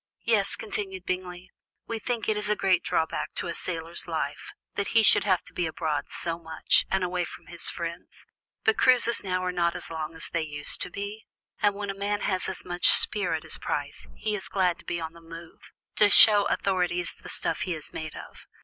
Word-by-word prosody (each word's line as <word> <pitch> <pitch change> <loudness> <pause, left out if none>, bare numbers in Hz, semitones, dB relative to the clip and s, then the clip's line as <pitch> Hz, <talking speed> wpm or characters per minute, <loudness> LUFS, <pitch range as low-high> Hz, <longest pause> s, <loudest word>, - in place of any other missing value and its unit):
"Yes," 210 -4 +2
continued 195 -4 -5
Bingley, 180 0 -4 0.3
"we 230 -1 -4
think 235 -1 -2
it 210 -1 0
a 210 - +3
great 190 -3 +2
drawback 160 - -1
to - - -2
a 170 - -3
sailor's 165 -1 -4
life, - - -3 0.2
that 200 - -2
he 225 - +6
should 205 - +5
have 185 -3 +2
to 180 - -12
be 175 -2 -1
abroad 155 -2 -2
so 165 0 -3
much, 160 -1 +2
and 190 -1 +1
away 180 0 0
from - - -9
his 170 0 -1
friends; 170 +1 -7 0.4
but 440 - +3
cruises 245 -2 +4
now 185 -1 -1
are 180 - 0
not 170 -1 +1
as - - -7
long 160 0 -4
as 160 - -3
they 170 - -1
used 145 -2 -2
to - - -2
be, 205 +2 -6 0.3
and 205 -1 +3
when 200 -1 -3
a - - -9
man 205 +1 -1
has 185 -2 0
as 190 - -5
much 175 0 +2
spirit 175 -6 +2
as 160 - -1
Price, - - -3
he 215 - -1
is 195 - -4
glad 185 -2 +1
to - - -15
be 170 - -2
on 160 0 -5
the 170 - -15
move, 165 0 -12 0.3
to 210 - +6
show 205 0 +8
authorities 180 -2 0
the - - -12
stuff 165 - +2
he 180 -3 -1
is 155 - -4
made 155 -1 -6
of. - - -11
180 Hz, 210 wpm, -27 LUFS, 170-205 Hz, 0.4 s, show